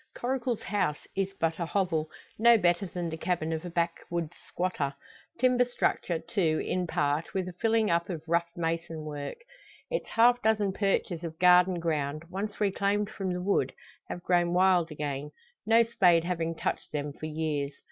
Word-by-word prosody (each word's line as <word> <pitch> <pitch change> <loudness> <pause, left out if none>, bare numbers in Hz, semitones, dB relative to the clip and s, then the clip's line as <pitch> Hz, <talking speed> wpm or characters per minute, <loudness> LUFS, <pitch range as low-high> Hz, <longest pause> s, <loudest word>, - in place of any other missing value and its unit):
Coracle's 245 -2 -2
house 185 -7 -1
is 195 0 0
but 165 +1 0
a 170 - 0
hovel, 165 -5 0 0.3
no 235 +1 +7
better 175 0 +2
than 175 0 -4
the 160 -1 -4
cabin 165 -2 -1
of 160 +1 -3
a 175 - -5
backwoods 170 -1 -2
squatter. 160 -6 -2 0.4
Timber 250 0 +4
structure, 240 -7 -1
too, 165 -1 0
in 180 -1 -1
part, 145 +2 -1
with 185 -1 -1
a 180 - -6
filling 225 +2 +2
up 170 +2 +1
of 165 -4 -4
rough 170 +1 +1
mason 165 -1 -3
work. 145 - -5 0.5
Its - - -2
half 245 +2 +4
dozen 210 -3 +2
perches 195 -4 0
of 160 -1 -6
garden 180 0 +5
ground, 155 -2 -1
once 200 +3 -4
reclaimed 205 0 +1
from 190 -2 -3
the 180 0 -3
wood, 180 -9 +1 0.4
have 175 - -6
grown 175 -1 +2
wild 180 -2 +4
again, 145 -2 -4 0.4
no 225 +1 +6
spade 180 -8 +4
having 165 -2 -2
touched - - -3
them 145 -1 -3
for 155 - -6
years. 150 -2 -2
175 Hz, 170 wpm, -29 LUFS, 160-195 Hz, 0.5 s, no